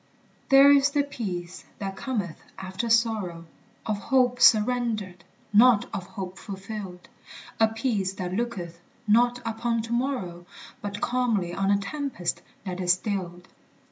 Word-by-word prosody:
There 275 Hz, 0 st, +8 dB
is 280 Hz, 0 st, +5 dB
the 285 Hz, 0 st, +1 dB
peace 185 Hz, -10 st, -5 dB
that 195 Hz, -1 st, -5 dB
cometh 200 Hz, -6 st, -3 dB, 0.2 s
after 190 Hz, +5 st, -4 dB
sorrow, 215 Hz, -7 st, +1 dB, 0.4 s
Of 215 Hz, -2 st, -1 dB
hope 250 Hz, +2 st, +2 dB
surrendered, 220 Hz, -5 st, +3 dB, 0.3 s
not 225 Hz, 0 st, +6 dB
of 190 Hz, -2 st, -4 dB
hope 190 Hz, -1 st, -7 dB
fulfilled; 195 Hz, -2 st, -7 dB, 0.5 s
A 225 Hz, -, +6 dB
peace 220 Hz, -4 st, -1 dB
that 180 Hz, -1 st, -5 dB
looketh 185 Hz, -7 st, -4 dB, 0.3 s
not 240 Hz, +3 st, +3 dB
upon 230 Hz, 0 st, -1 dB
to 230 Hz, +1 st, -4 dB
morrow, 235 Hz, -9 st, -2 dB, 0.3 s
But 205 Hz, 0 st, -5 dB
calmly 230 Hz, -8 st, 0 dB
on 195 Hz, +2 st, 0 dB
a 200 Hz, -, +4 dB
tempest 200 Hz, -, -3 dB, 0.2 s
that 185 Hz, -1 st, -4 dB
is 180 Hz, -1 st, +4 dB
stilled. 185 Hz, -2 st, -4 dB
210 Hz, 135 wpm, -26 LUFS, 185-240 Hz, 0.5 s, There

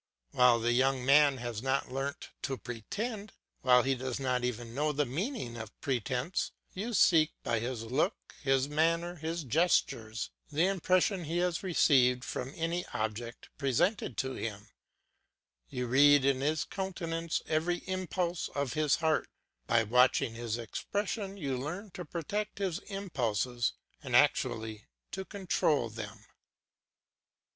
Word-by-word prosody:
While 125 Hz, -1 st, +5 dB
the 120 Hz, +1 st, +1 dB
young 130 Hz, 0 st, +2 dB
man 140 Hz, 0 st, +6 dB
has 120 Hz, -3 st, -4 dB
not 135 Hz, 0 st, 0 dB
learnt 135 Hz, +2 st, -4 dB
to 135 Hz, -1 st, -2 dB
pretend, 200 Hz, -, -5 dB, 0.3 s
while 125 Hz, -1 st, +5 dB
he 135 Hz, -, +2 dB
does 130 Hz, 0 st, -3 dB
not 125 Hz, -2 st, 0 dB
even 120 Hz, -1 st, -3 dB
know 150 Hz, +4 st, +1 dB
the 145 Hz, 0 st, +1 dB
meaning 150 Hz, -, -3 dB
of 110 Hz, -1 st, -9 dB
pretence, 130 Hz, -, -1 dB, 0.2 s
you 220 Hz, +5 st, -3 dB
see 160 Hz, -4 st, +5 dB
by 115 Hz, -, 0 dB
his 120 Hz, 0 st, -3 dB
look, 130 Hz, -, -1 dB
his 135 Hz, -1 st, +2 dB
manner, 165 Hz, +3 st, +1 dB
his 165 Hz, +1 st, -3 dB
gestures, 120 Hz, -6 st, +1 dB, 0.2 s
the 155 Hz, +4 st, +3 dB
impression 185 Hz, -1 st, +2 dB
he 165 Hz, +3 st, -2 dB
has 175 Hz, -1 st, +1 dB
received 130 Hz, -9 st, +4 dB
from 130 Hz, +1 st, -4 dB
any 170 Hz, +2 st, -1 dB
object 110 Hz, +2 st, -4 dB
presented 140 Hz, -, +1 dB
to 130 Hz, 0 st, -1 dB
him; 105 Hz, -3 st, -5 dB, 1.0 s
you 125 Hz, 0 st, -3 dB
read 140 Hz, +2 st, +6 dB
in 135 Hz, -1 st, +2 dB
his 150 Hz, 0 st, +1 dB
countenance 170 Hz, -4 st, -3 dB
every 165 Hz, +3 st, 0 dB
impulse 180 Hz, -2 st, -2 dB
of 140 Hz, -3 st, -1 dB
his 150 Hz, -3 st, +3 dB
heart; 160 Hz, -1 st, +1 dB, 0.4 s
by 115 Hz, -1 st, +4 dB
watching 125 Hz, +1 st, +3 dB
his 115 Hz, -1 st, -3 dB
expression 200 Hz, -, -3 dB
you 140 Hz, -7 st, -2 dB
learn 175 Hz, +11 st, -5 dB
to 180 Hz, 0 st, -7 dB
protect 205 Hz, +6 st, -3 dB
his 190 Hz, -4 st, -1 dB
impulses 125 Hz, -, -1 dB, 0.3 s
and -, -, -2 dB
actually 110 Hz, -1 st, +2 dB, 0.2 s
to 190 Hz, -, -4 dB
control 165 Hz, -, 0 dB
them. 110 Hz, -1 st, -8 dB
140 Hz, 140 wpm, -31 LUFS, 125-175 Hz, 1.0 s, man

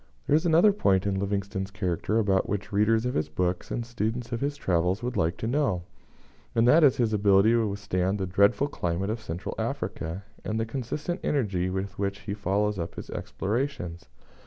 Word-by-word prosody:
There 145 Hz, -, +3 dB
is 160 Hz, +3 st, +2 dB
another 170 Hz, +6 st, +6 dB
point 95 Hz, -, +2 dB
in 95 Hz, -1 st, 0 dB
Livingstone's 100 Hz, -1 st, -2 dB
character 100 Hz, +1 st, -1 dB
about 100 Hz, -4 st, +2 dB
which 100 Hz, 0 st, -3 dB
readers 110 Hz, +3 st, +3 dB
of 125 Hz, -, -1 dB
his 75 Hz, 0 st, -1 dB
books, 90 Hz, +3 st, -1 dB
and 120 Hz, -, -3 dB
students 120 Hz, 0 st, -3 dB
of 115 Hz, -, -2 dB
his 145 Hz, +1 st, -1 dB
travels, 90 Hz, -1 st, 0 dB
would 125 Hz, 0 st, -2 dB
like 80 Hz, +3 st, +1 dB
to -, -, -4 dB
know, 115 Hz, -, +1 dB, 0.7 s
and 115 Hz, +1 st, +4 dB
that 155 Hz, +6 st, +6 dB
is 140 Hz, -4 st, +5 dB
his 115 Hz, -3 st, +1 dB
ability 100 Hz, +1 st, +5 dB
to 115 Hz, -2 st, +3 dB
withstand 100 Hz, -1 st, -1 dB
the 95 Hz, -, -2 dB
dreadful 100 Hz, +9 st, +3 dB
climate 90 Hz, -5 st, -2 dB
of 110 Hz, 0 st, -4 dB
Central 85 Hz, -4 st, -5 dB
Africa, 85 Hz, +5 st, -3 dB, 0.2 s
and 110 Hz, +1 st, -2 dB
the 110 Hz, -, 0 dB
consistent 140 Hz, -, -3 dB
energy 95 Hz, -10 st, 0 dB
with 95 Hz, +1 st, -4 dB
which 100 Hz, 0 st, -2 dB
he 100 Hz, -, -4 dB
follows 105 Hz, 0 st, 0 dB
up 85 Hz, -, -4 dB
his -, -, -8 dB
explorations. 105 Hz, -6 st, -3 dB
100 Hz, 190 wpm, -27 LUFS, 95-120 Hz, 0.7 s, another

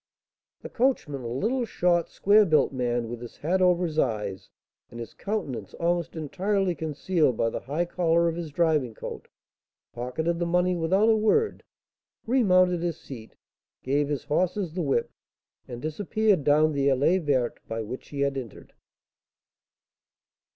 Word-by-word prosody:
The -, -, -7 dB
coachman, 230 Hz, -, 0 dB
a 120 Hz, -, -6 dB
little, 220 Hz, -, -1 dB
short, 175 Hz, -6 st, +1 dB
square 210 Hz, +2 st, +4 dB
built 155 Hz, -7 st, +2 dB
man, 120 Hz, -2 st, -1 dB
with 120 Hz, +1 st, -7 dB
his 120 Hz, -, -10 dB
hat 180 Hz, +5 st, 0 dB
over 180 Hz, -1 st, +3 dB
his 155 Hz, -2 st, -2 dB
eyes, 105 Hz, -6 st, -2 dB, 0.4 s
and 120 Hz, -, -10 dB
his 115 Hz, -, -7 dB
countenance 170 Hz, -, -4 dB
almost 170 Hz, 0 st, -1 dB
entirely 185 Hz, +5 st, -1 dB
concealed 155 Hz, -3 st, 0 dB
by 115 Hz, -, +1 dB
the -, -, -3 dB
high 150 Hz, +7 st, -2 dB
collar 170 Hz, -1 st, +2 dB
of 165 Hz, -, -1 dB
his 170 Hz, -2 st, -5 dB
driving 150 Hz, -7 st, +1 dB
coat, -, -, -8 dB, 0.7 s
pocketed 160 Hz, +8 st, -2 dB
the 175 Hz, -, 0 dB
money 180 Hz, +1 st, +2 dB
without 185 Hz, +6 st, +2 dB
a 225 Hz, -, +5 dB
word, 220 Hz, -, +1 dB, 0.6 s
remounted 185 Hz, -8 st, +3 dB
his 170 Hz, -2 st, -2 dB
seat, 115 Hz, -5 st, -11 dB, 0.5 s
gave 140 Hz, +2 st, +1 dB
his 145 Hz, -3 st, -2 dB
horses 180 Hz, +2 st, -1 dB
the 180 Hz, -, -2 dB
whip, 135 Hz, -6 st, 0 dB, 0.6 s
and 120 Hz, 0 st, -8 dB
disappeared 200 Hz, +3 st, +1 dB
down 150 Hz, +2 st, +4 dB
the 140 Hz, -2 st, 0 dB
allée 140 Hz, +7 st, +3 dB
verte 130 Hz, -5 st, 0 dB
by 115 Hz, 0 st, -3 dB
which 120 Hz, +4 st, -8 dB
he 140 Hz, -1 st, -4 dB
had 140 Hz, -1 st, 0 dB
entered. 120 Hz, -5 st, -11 dB
160 Hz, 155 wpm, -26 LUFS, 135-180 Hz, 0.7 s, a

